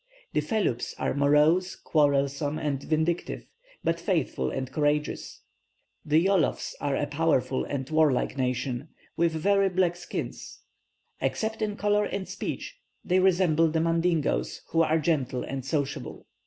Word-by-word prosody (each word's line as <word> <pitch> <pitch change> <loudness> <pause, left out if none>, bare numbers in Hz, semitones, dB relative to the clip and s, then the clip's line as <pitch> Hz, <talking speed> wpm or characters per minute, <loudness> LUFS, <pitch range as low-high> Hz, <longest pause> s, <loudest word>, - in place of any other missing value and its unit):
The - - +2
Feloups 205 - -1
are - - -1
morose, 150 +6 +3
quarrelsome, 145 0 +1
and 145 -3 -2
vindictive, 160 +3 -1 0.4
but 165 0 0
faithful 160 - 0
and 130 -1 -4
courageous. 150 0 -1 0.6
The 155 +3 +3
Yolofs 195 -5 +1
are 140 -1 0
a 145 - 0
powerful 145 -3 +1
and 135 -2 -3
warlike 155 -5 +2
nation, 125 +2 -2 0.3
with 170 -1 +2
very 195 +4 +2
black 180 -1 +1
skins. 175 - -6 0.6
Except 220 0 -1
in 210 -1 -1
colour 205 0 +2
and 195 -2 -4
speech, - - -5 0.3
they 185 +1 +3
resemble 175 -4 +3
the 160 +1 0
Mandingoes, 165 -1 0
who 165 - +2
are 160 0 +3
gentle 140 -6 0
and 135 -1 -4
sociable. 140 0 -3
160 Hz, 135 wpm, -27 LUFS, 140-175 Hz, 0.6 s, morose